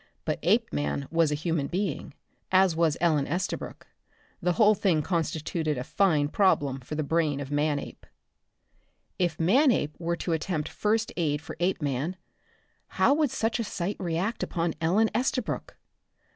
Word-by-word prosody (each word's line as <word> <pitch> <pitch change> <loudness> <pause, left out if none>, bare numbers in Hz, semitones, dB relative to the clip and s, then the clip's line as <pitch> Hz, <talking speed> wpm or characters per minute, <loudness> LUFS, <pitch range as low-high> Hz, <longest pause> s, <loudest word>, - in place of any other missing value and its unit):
But - - -1
Apeman 75 -1 0
was 165 -2 +3
a - - +1
human 155 -2 -1
being, 195 +3 -3 0.4
as 185 -2 +4
was 165 -2 +2
Ellen 155 -5 +2
Estabrook. 180 +5 -4 0.6
The 180 - +1
whole 215 +2 +5
thing 180 -6 +1
constituted 160 -2 -1
a 125 - -3
fine 155 -2 +2
problem 145 -8 +2
for 130 +4 -7
the 155 - -1
brain 155 -1 0
of 140 0 -6
Manape. 145 0 -2 1.1
If 175 -3 0
Manape 195 - +3
were 170 0 -1
to 170 0 -2
attempt 160 -1 -2
first 220 +1 0
aid 150 -4 0
for 155 - -9
Apeman, 160 -2 -1 0.8
how 275 - +5
would 300 -1 +2
such 225 +1 -1
a - - 0
sight 190 -1 -3
react 180 +6 -2
upon 170 -2 -1
Ellen 200 +7 +3
Estabrook? 250 0 -2
165 Hz, 145 wpm, -27 LUFS, 150-190 Hz, 1.1 s, whole